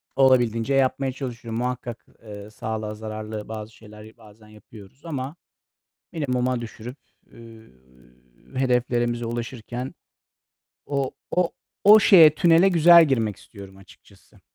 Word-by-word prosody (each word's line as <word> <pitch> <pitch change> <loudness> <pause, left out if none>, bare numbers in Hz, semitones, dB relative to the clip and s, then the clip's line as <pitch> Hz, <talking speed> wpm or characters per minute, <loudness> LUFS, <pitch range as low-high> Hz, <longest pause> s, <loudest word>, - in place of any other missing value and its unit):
Olabildiğince 125 -2 +2
yapmaya 135 0 +1
çalışıyorum. 120 -3 -6
Muhakkak, 125 -2 -5 0.2
eee, 105 -1 -10
sağlığa 110 0 -5
zararlı 110 0 -7
bazı 110 0 -8
şeyler 105 +1 -15
bazen 110 -1 -18
yapıyoruz 110 - -17
ama 140 -1 -5 0.8
minimuma 125 -6 -2
düşürüp, 120 +3 -9 0.3
üüü, 115 - -16 0.8
hedeflerimize 120 -2 0
ulaşırken 120 +2 -6 0.9
o 140 -2 -2 0.2
o 180 -1 0 0.3
o 215 +2 +8
şeye, 160 -7 +7
tünele 170 +2 +4
güzel 170 -1 +7
girmek 115 -8 -1
istiyorum 100 -2 -14
açıkçası. 95 0 -21
120 Hz, 105 wpm, -23 LUFS, 110-135 Hz, 0.9 s, o